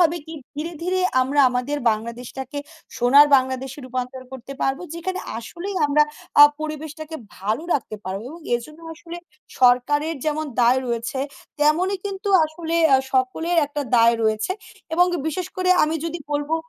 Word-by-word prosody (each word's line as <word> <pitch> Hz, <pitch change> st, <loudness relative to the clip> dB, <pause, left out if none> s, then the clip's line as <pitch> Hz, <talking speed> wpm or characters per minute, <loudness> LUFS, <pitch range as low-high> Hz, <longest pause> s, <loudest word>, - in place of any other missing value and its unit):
হবে 340 Hz, -1 st, +4 dB
কি 320 Hz, -, -8 dB, 0.2 s
ধীরে, 325 Hz, +3 st, -4 dB
ধীরে 370 Hz, +2 st, 0 dB, 0.2 s
আমরা 280 Hz, +3 st, +2 dB
আমাদের 250 Hz, +4 st, -1 dB
বাংলাদেশটাকে 245 Hz, +5 st, -5 dB, 0.4 s
সোনার 275 Hz, +5 st, +7 dB
বাংলাদেশে 260 Hz, +1 st, -2 dB
রূপান্তর 255 Hz, 0 st, -5 dB
করতে 265 Hz, +1 st, -8 dB
পারবো। 270 Hz, +5 st, 0 dB
যেখানে 370 Hz, +2 st, -4 dB, 0.2 s
আসলেই 345 Hz, -, -6 dB
আমরা 295 Hz, +1 st, +4 dB, 0.4 s
আ -, -, +13 dB, 0.2 s
পরিবেশটাকে 310 Hz, +1 st, -6 dB, 0.2 s
ভালো 215 Hz, -, -1 dB
রাখতে 235 Hz, -6 st, -3 dB
পারবো 190 Hz, +2 st, -4 dB
এবং 335 Hz, +2 st, -11 dB
এরজন্য 305 Hz, +7 st, -5 dB
আসলে 335 Hz, +1 st, -9 dB, 0.4 s
সরকারের 290 Hz, +6 st, +3 dB
যেমন 310 Hz, 0 st, -1 dB, 0.2 s
দায় 245 Hz, +2 st, +4 dB
রয়েছে 235 Hz, +2 st, -3 dB, 0.4 s
তেমনই 350 Hz, +7 st, +2 dB
কিন্তু 395 Hz, +1 st, -4 dB, 0.2 s
আসলে 320 Hz, +1 st, -4 dB, 0.2 s
আ -, -, +8 dB, 0.2 s
সকলের 265 Hz, +7 st, 0 dB
একটা 290 Hz, 0 st, -4 dB
দায় 230 Hz, 0 st, +6 dB
রয়েছে 220 Hz, +9 st, +1 dB, 0.4 s
এবং 355 Hz, +2 st, +5 dB, 0.2 s
বিশেষ 345 Hz, +3 st, -3 dB
করে 370 Hz, 0 st, +1 dB
আমি 310 Hz, -, -2 dB
যদি 335 Hz, +1 st, -3 dB
বলবো 290 Hz, +2 st, 0 dB
290 Hz, 145 wpm, -22 LUFS, 250-330 Hz, 0.4 s, আ